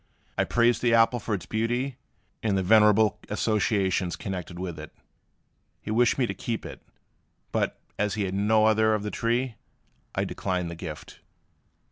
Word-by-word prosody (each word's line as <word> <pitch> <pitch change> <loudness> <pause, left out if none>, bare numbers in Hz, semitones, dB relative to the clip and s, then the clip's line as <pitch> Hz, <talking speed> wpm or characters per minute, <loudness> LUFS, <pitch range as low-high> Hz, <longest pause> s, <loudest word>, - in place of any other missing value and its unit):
I - - +1
praised 120 0 +2
the 120 -2 +4
apple 115 +2 +4
for 110 -1 -2
its 90 - -7
beauty, 120 +4 -1 0.4
and 105 -3 +1
the 95 - 0
venerable 105 +1 +5
associations 100 -4 +1
connected 90 -2 -6
with 90 -3 -5
it. 75 - -9 0.9
He 105 - -6
wished 120 +2 +3
me 130 - +2
to 100 - -3
keep 110 +4 -4
it; - - -9 0.7
but, - - -1 0.2
as 105 0 0
he 105 - -1
had 95 -1 -2
no 110 +2 +3
other 110 0 +4
of 105 - -3
the 105 - -3
tree, 120 0 -1 0.6
I - - +1
declined 90 -3 -2
the - - -6
gift. 80 -2 -8
105 Hz, 165 wpm, -26 LUFS, 95-115 Hz, 0.9 s, venerable